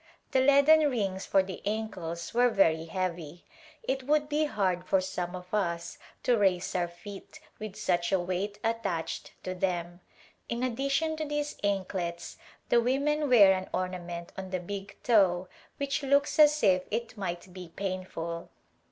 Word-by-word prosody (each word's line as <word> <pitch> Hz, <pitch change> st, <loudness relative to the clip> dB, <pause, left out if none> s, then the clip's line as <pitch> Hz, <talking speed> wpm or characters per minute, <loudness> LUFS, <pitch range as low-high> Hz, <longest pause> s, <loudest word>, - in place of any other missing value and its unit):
The 265 Hz, -, +3 dB
leaden 285 Hz, +3 st, +6 dB
rings 195 Hz, -7 st, -2 dB
for 195 Hz, -, +4 dB
the 190 Hz, 0 st, -7 dB
ankles 185 Hz, -6 st, -4 dB
were 245 Hz, +1 st, +4 dB
very 165 Hz, -7 st, +3 dB
heavy; 175 Hz, -2 st, -4 dB, 0.4 s
it 265 Hz, 0 st, -1 dB
would 295 Hz, +2 st, +1 dB
be 305 Hz, +1 st, +2 dB
hard 185 Hz, -9 st, 0 dB
for 190 Hz, +1 st, +2 dB
some 185 Hz, -1 st, -3 dB
of 180 Hz, +1 st, -10 dB
us 170 Hz, -5 st, -1 dB, 0.2 s
to 245 Hz, -, +4 dB
raise 190 Hz, -4 st, +1 dB
our 175 Hz, -1 st, +1 dB
feet 195 Hz, -, -11 dB, 0.2 s
with 215 Hz, -2 st, -6 dB
such 175 Hz, 0 st, 0 dB
a 190 Hz, -, +3 dB
weight 185 Hz, +3 st, -2 dB
attached 200 Hz, -8 st, -2 dB
to 185 Hz, -, -3 dB
them. 175 Hz, -1 st, -2 dB, 0.5 s
In 235 Hz, +1 st, -2 dB
addition 275 Hz, +6 st, 0 dB
to 310 Hz, -, -2 dB
these 295 Hz, 0 st, -2 dB
anklets 185 Hz, -4 st, -2 dB, 0.3 s
the 235 Hz, -, +5 dB
women 285 Hz, +4 st, +1 dB
wear 205 Hz, -6 st, +8 dB
an 185 Hz, 0 st, -4 dB
orna 185 Hz, 0 st, -2 dB
ment 170 Hz, 0 st, -7 dB
on 190 Hz, -1 st, -6 dB
the 185 Hz, -1 st, -2 dB
big 200 Hz, +2 st, -7 dB
toe 185 Hz, -6 st, +3 dB, 0.3 s
which 280 Hz, 0 st, -1 dB
looks 280 Hz, +3 st, +2 dB
as 300 Hz, 0 st, +6 dB
if 185 Hz, -3 st, +5 dB
it 230 Hz, +1 st, -3 dB
might 180 Hz, -2 st, -5 dB
be 180 Hz, -2 st, -9 dB
painful. 185 Hz, -3 st, -4 dB
195 Hz, 160 wpm, -29 LUFS, 180-245 Hz, 0.5 s, wear